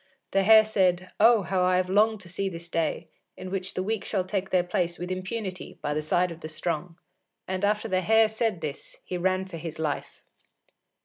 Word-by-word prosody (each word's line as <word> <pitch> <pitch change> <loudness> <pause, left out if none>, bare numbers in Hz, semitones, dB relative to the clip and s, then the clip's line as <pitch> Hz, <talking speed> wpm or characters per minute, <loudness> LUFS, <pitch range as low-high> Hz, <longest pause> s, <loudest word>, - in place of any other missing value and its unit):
The 195 - +3
Hare 220 +2 +8
said, 185 -4 +1
"Oh, 225 -1 +6
how 185 0 0
I 180 0 +3
have 185 0 +1
longed 210 +2 +3
to 185 - -12
see 195 +3 -2
this 170 -1 -9
day, 165 -2 -1 0.3
in 185 - -7
which 190 -1 -3
the 185 - -1
weak 220 +2 -2
shall 195 -4 -1
take 190 0 -3
their 180 -1 +3
place 175 -1 -1
with 180 +1 -5
impunity 185 0 -5
by 145 - -2
the 155 - -1
side 175 +4 +1
of 165 - -9
the 155 - -7
strong." 165 +1 -4 0.5
And 185 +1 -3
after 210 +2 +1
the 185 -3 +1
Hare 220 +3 +5
said 220 -4 -1
this, 150 -3 -6
he 185 - -4
ran 185 +1 +1
for 185 -3 -8
his 160 -1 -6
life. 155 -2 -4
185 Hz, 210 wpm, -27 LUFS, 175-205 Hz, 0.5 s, Hare